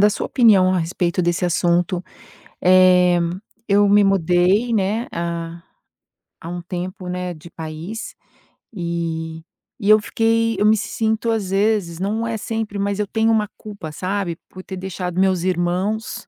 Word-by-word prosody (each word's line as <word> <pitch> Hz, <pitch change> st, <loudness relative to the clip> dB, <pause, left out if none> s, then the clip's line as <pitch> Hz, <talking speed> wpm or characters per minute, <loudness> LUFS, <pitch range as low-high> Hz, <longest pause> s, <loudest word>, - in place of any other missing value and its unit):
da 205 Hz, -, +6 dB
sua 210 Hz, -, -2 dB
opinião 200 Hz, -7 st, +4 dB
a -, -, +2 dB
respeito 170 Hz, +1 st, -1 dB
desse 175 Hz, +1 st, 0 dB
assunto. 175 Hz, +1 st, +1 dB, 0.6 s
Eh, 180 Hz, -1 st, +5 dB, 0.5 s
eu 205 Hz, 0 st, +4 dB
me 205 Hz, +1 st, +5 dB
mudei, 195 Hz, +4 st, +2 dB
né, 215 Hz, +3 st, 0 dB
há 170 Hz, 0 st, -4 dB, 0.8 s
há 165 Hz, -, -7 dB
um 175 Hz, 0 st, -5 dB
tempo, 180 Hz, +1 st, -6 dB
né, 180 Hz, 0 st, -3 dB
de 165 Hz, +1 st, -13 dB
país 165 Hz, +8 st, -7 dB, 0.6 s
eh, 165 Hz, -2 st, -3 dB, 0.4 s
e 205 Hz, -2 st, -1 dB
eu 215 Hz, 0 st, +8 dB
fiquei 225 Hz, +1 st, +1 dB
eu 210 Hz, -, +3 dB
me 215 Hz, +1 st, +6 dB
sinto 220 Hz, +2 st, -1 dB
às 215 Hz, -4 st, -1 dB
vezes, 195 Hz, -4 st, +1 dB
não 215 Hz, +4 st, -1 dB
é 230 Hz, -1 st, -2 dB
sempre, 220 Hz, -1 st, -4 dB
mas 200 Hz, 0 st, -1 dB
eu 210 Hz, -, +1 dB
tenho 225 Hz, +2 st, +1 dB
uma 215 Hz, -2 st, +2 dB
culpa, 200 Hz, -7 st, -8 dB
sabe, 185 Hz, +1 st, -3 dB
por 185 Hz, -, -11 dB
ter 190 Hz, -, -7 dB
deixado 185 Hz, -1 st, -4 dB
meus 190 Hz, -2 st, +2 dB
irmãos, 185 Hz, +6 st, -1 dB
185 Hz, 155 wpm, -20 LUFS, 175-210 Hz, 0.8 s, eu